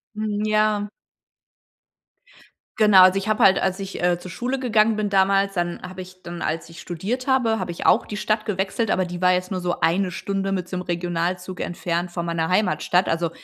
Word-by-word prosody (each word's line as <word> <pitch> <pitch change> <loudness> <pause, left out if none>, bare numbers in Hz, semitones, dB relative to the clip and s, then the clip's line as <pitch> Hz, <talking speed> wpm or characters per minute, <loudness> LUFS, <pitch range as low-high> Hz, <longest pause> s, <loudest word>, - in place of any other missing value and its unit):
Mhm, 215 0 -2
ja. 215 -1 +1 1.9
Genau, 210 -4 +7
also, 185 +1 +5
ich 200 +2 -2
habe 215 - +1
halt, 190 - +6
als 190 0 -1
ich, 195 -2 -6
äh, 175 -1 +2
zur 185 - -9
Schule 255 +7 -3
gegangen 220 -3 +2
bin 210 -1 -1
damals 195 0 +2
dann 175 -1 -2
habe 185 +1 -8
ich 185 0 -13
dann 170 0 -7
als 160 +1 -2
ich 165 - -11
studiert 205 +9 -4
habe, 245 -5 +2
habe 175 - -4
ich 170 - -7
auch - - +4
die 210 - -6
Stadt 215 0 -1
gewechselt, 200 +2 -1
aber 185 - +1
die 175 0 -7
war 180 0 +5
jetzt 180 0 0
nur 185 -2 -3
so 175 0 -2
1 180 +3 +1
Stunde 195 +2 -3
mit 180 -2 -2
so 185 - -6
'nem 180 - -3
Regionalzug 175 +1 -3
entfernt 175 0 -3
von 170 -1 -4
meiner 165 -1 -1
Heimatstadt. 180 -1 +1
Also, 165 0 0
185 Hz, 205 wpm, -23 LUFS, 175-210 Hz, 1.9 s, Genau